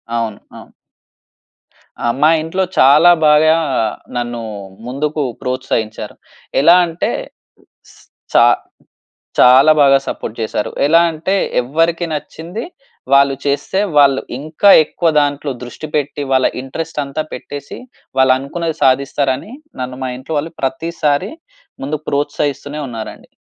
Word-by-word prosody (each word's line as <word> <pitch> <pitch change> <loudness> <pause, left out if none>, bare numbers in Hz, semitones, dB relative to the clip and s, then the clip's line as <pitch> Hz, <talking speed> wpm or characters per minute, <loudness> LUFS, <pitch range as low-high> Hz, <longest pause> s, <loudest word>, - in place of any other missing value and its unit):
అవును. 115 -3 -3 0.2
అవును. - - -14 1.3
ఆ! - - 0 0.2
మా 155 - +6
ఇంట్లో 165 +4 -1 0.2
చాలా 150 +6 +7 0.2
బాగా 155 +1 +5 0.6
నన్ను 120 -1 -3 0.5
ముందుకు 150 +4 -2 0.2
ప్రోత్సహించారు. 115 -4 -3 0.5
ఎలా 170 +5 +7
అంటే 165 0 -3 1.3
చా - - +7 1.0
చాలా 130 +5 +7
బాగా 135 -1 +6
సపోర్ట్ 110 - -5
చేసారు. 110 -1 -2 0.2
ఎలా 165 +3 +5
అంటే, 165 +5 -2 0.3
ఎవరికి 165 +7 0
నచ్చింది 165 - -6 0.5
వాళ్ళు 140 0 +5
చేస్తే, 145 +6 -1 0.2
వాళ్ళు 140 -2 +5 0.2
ఇంకా 155 +7 +2 0.2
ఎక్కువ 170 +2 0
దాంట్లో 145 0 -1
దృష్టి 125 +5 -8
పెట్టి 145 0 -2
వాళ్ళ 130 -1 +3
ఇంట్రెస్ట్ 150 +4 -6
అంతా 140 +3 -4
పెట్టేసి, 140 +2 -8 0.4
వాళ్ళు 130 0 +5
అనుకున్నది 160 +4 -4
సాధిస్తారని, 135 - +1 0.3
నన్ను 125 0 -5
మా 130 - -2
ఇంట్లో 140 +5 -6
వాళ్ళు 160 +3 -6
ప్రతిసారి 150 +4 -1 0.5
ముందు 150 +2 -3
ప్రోత్సహిస్తూనే 145 0 -2
ఉన్నారండి. 115 -3 -8
145 Hz, 115 wpm, -16 LUFS, 130-155 Hz, 1.3 s, చాలా